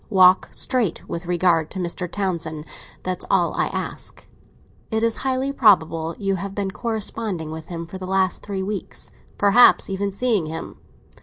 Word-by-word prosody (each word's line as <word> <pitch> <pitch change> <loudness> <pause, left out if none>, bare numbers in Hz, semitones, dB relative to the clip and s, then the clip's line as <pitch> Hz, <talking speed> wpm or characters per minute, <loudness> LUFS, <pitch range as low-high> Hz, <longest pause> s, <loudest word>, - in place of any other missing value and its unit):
Walk 185 -2 +6
straight 240 -10 -1
with 170 +1 -5
regard 170 -3 +2
to - - -6
Mr. 180 0 -2
Townsend; 165 -6 -2 0.4
that's 185 -1 -3
all - - +2
I - - +1
ask. - - -5 0.6
It 220 -1 0
is 230 -1 +2
highly 265 +1 -1
probable 165 - +3
you 195 -2 0
have 195 +1 -6
been 200 -2 -2
corresponding 215 -6 -3
with 160 0 -7
him 170 -1 -5
for 185 +3 -9
the 185 - -6
last 190 -1 +1
three 195 -2 -4
weeks—perhaps 205 +2 +2
even 200 +1 -1
seeing 210 -5 0
him. 160 +1 -7
190 Hz, 155 wpm, -22 LUFS, 170-210 Hz, 0.6 s, Walk